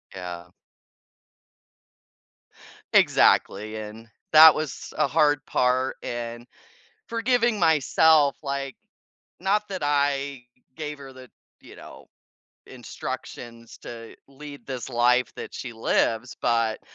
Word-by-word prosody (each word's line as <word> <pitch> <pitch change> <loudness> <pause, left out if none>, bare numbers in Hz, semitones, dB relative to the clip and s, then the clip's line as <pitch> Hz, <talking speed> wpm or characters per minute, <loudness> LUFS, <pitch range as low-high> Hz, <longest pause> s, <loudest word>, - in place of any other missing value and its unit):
Yeah. 90 -1 -8 2.4
Exactly, 110 +2 +3
and 110 +1 -9 0.3
that 160 0 +10
was 155 -4 -6
a - - +2
hard 145 -1 +2
part 130 +1 0
and 120 0 -6 0.6
forgiving 235 -1 +1
myself, 160 -3 +3
like 140 -1 -4 0.6
not 205 +3 0
that 190 -2 -5
I 140 -2 -1 0.3
gave 150 -1 -6
her 135 -1 -11
the, 130 -1 -14 0.3
you - - -15
know, - - -13 0.6
instructions 115 -1 -8
to 115 -1 -10
lead 145 +1 -12
this 130 -3 -6
life 125 0 +2
that - - -8
she 125 - -6
lives, 115 +1 0
but 115 -2 0
135 Hz, 105 wpm, -24 LUFS, 120-150 Hz, 2.4 s, that